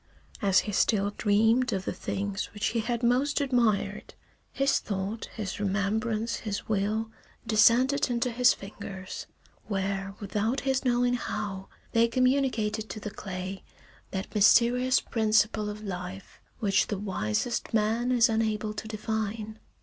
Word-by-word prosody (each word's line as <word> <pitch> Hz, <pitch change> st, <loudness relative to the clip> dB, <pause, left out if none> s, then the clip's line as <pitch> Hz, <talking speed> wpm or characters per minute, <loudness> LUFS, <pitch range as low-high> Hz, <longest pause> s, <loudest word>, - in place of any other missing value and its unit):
III 200 Hz, -, +1 dB
As 190 Hz, -, +6 dB
he 210 Hz, -, -5 dB
still 200 Hz, 0 st, +2 dB
dreamed 225 Hz, +4 st, +3 dB
of 190 Hz, -1 st, -2 dB
the -, -, -2 dB
things 200 Hz, 0 st, -3 dB
which 210 Hz, -, 0 dB
he 230 Hz, -, -1 dB
had 235 Hz, +1 st, -2 dB
most 255 Hz, +5 st, +2 dB
admired, 240 Hz, -7 st, 0 dB, 0.4 s
his 275 Hz, 0 st, +2 dB
thought, 200 Hz, +2 st, -4 dB
his 205 Hz, -4 st, -4 dB
remembrance, 215 Hz, +3 st, 0 dB
his 205 Hz, -3 st, -4 dB
will, 215 Hz, +2 st, 0 dB, 0.3 s
descended 245 Hz, +6 st, +4 dB
into 240 Hz, 0 st, 0 dB
his 245 Hz, +1 st, +5 dB
fingers, 195 Hz, -1 st, -7 dB, 0.4 s
where 195 Hz, -1 st, -2 dB
without 210 Hz, +5 st, -1 dB
his 265 Hz, -1 st, 0 dB
knowing 245 Hz, -1 st, +2 dB
how 195 Hz, -5 st, -3 dB, 0.2 s
they 230 Hz, 0 st, +4 dB
communicated 250 Hz, -4 st, +1 dB
to 215 Hz, -, -6 dB
the 210 Hz, 0 st, -6 dB
clay 190 Hz, -2 st, -6 dB, 0.5 s
that 190 Hz, +1 st, -5 dB
mysterious 240 Hz, +5 st, +5 dB
principle 215 Hz, -1 st, +1 dB
of 210 Hz, +1 st, -7 dB
life 185 Hz, -1 st, -7 dB, 0.2 s
which 200 Hz, -2 st, +2 dB
the 205 Hz, -, -2 dB
wisest 190 Hz, -, -2 dB
man 225 Hz, +3 st, +1 dB
is 240 Hz, -2 st, +5 dB
unable 220 Hz, -1 st, 0 dB
to 215 Hz, -, -6 dB
define. 220 Hz, 0 st, -3 dB
215 Hz, 140 wpm, -28 LUFS, 200-235 Hz, 0.5 s, As